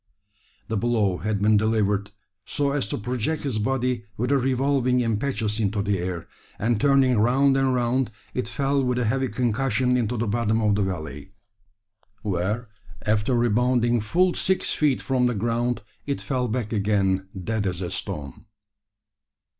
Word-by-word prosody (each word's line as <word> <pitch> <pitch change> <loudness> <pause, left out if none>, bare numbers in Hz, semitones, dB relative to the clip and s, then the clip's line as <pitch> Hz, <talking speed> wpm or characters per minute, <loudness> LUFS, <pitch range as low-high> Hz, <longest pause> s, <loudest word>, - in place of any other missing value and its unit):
The 110 - -1
blow 105 -4 +1
had 105 -1 -2
been 105 0 +5
delivered 105 -2 +1 0.3
so 140 -1 -1
as 140 -7 -1
to - - -2
project 125 +7 -2
his 130 -7 -1
body 125 0 0
with 125 +4 -1
a 140 - +5
revolving 130 0 +1
impetus 115 -2 -1
into 105 -1 0
the 100 -2 0
air; 90 -1 -4 0.3
and 115 0 0
turning 135 -4 +4
round 135 +5 +4
and 135 -1 +2
round, 125 +1 +1 0.2
it 125 - -2
fell 140 0 0
with 125 -1 0
a 125 - +1
heavy 130 +4 +1
concussion 125 +1 +1
into 120 -1 0
the 115 - 0
bottom 110 +1 +1
of 105 -2 +2
the 100 - +1
valley; 80 -3 -4 0.9
where, 105 +4 -1 0.4
after 105 +3 +1
rebounding 120 0 +2
full 175 - +2
six 190 0 0
feet 145 -4 +1
from 130 -2 +2
the 120 - -1
ground, 120 +3 -1 0.2
it 140 - -1
fell 130 -2 -1
back 115 -1 -2
again 100 -2 +1
dead 105 +2 -1
as 90 -2 -2
a 90 -2 -4
stone. 70 -3 -6
120 Hz, 160 wpm, -24 LUFS, 105-130 Hz, 0.9 s, been